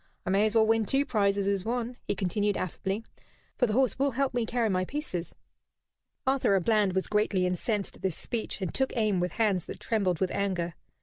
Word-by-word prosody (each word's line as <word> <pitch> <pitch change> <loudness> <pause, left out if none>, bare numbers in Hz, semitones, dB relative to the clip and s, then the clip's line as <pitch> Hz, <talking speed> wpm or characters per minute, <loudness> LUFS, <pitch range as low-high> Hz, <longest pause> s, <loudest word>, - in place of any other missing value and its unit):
"I 185 - 0
may 200 +2 +4
as 215 - -2
well 220 -1 +6
win 225 -1 +2
two 275 +1 +2
prizes 200 -4 +1
as 200 -2 +1
one," 240 +2 -2
he - - 0
continued, 205 +2 0
affably, 195 +4 -3 0.6
"for 245 - +4
the 215 - -1
horse 260 -1 +2
will 280 +1 +3
help 275 -2 +1
me 240 -2 0
carry 235 -1 +1
my 185 -3 +1
pieces." 185 - -4 0.9
Arthur 260 -7 +3
à 175 - -7
Bland 210 -4 +3
was 190 0 0
greatly 210 -3 +1
incensed 195 +3 -1
at - - -20
this 190 -4 -1
speech, 225 -3 -4
and 180 - -3
took 265 -2 -1
aim 210 -4 +2
with 180 -1 -1
hands 200 -6 +1
that - - -7
trembled 190 -7 0
with 185 - 0
anger. 180 -4 -1
205 Hz, 210 wpm, -29 LUFS, 190-230 Hz, 0.9 s, well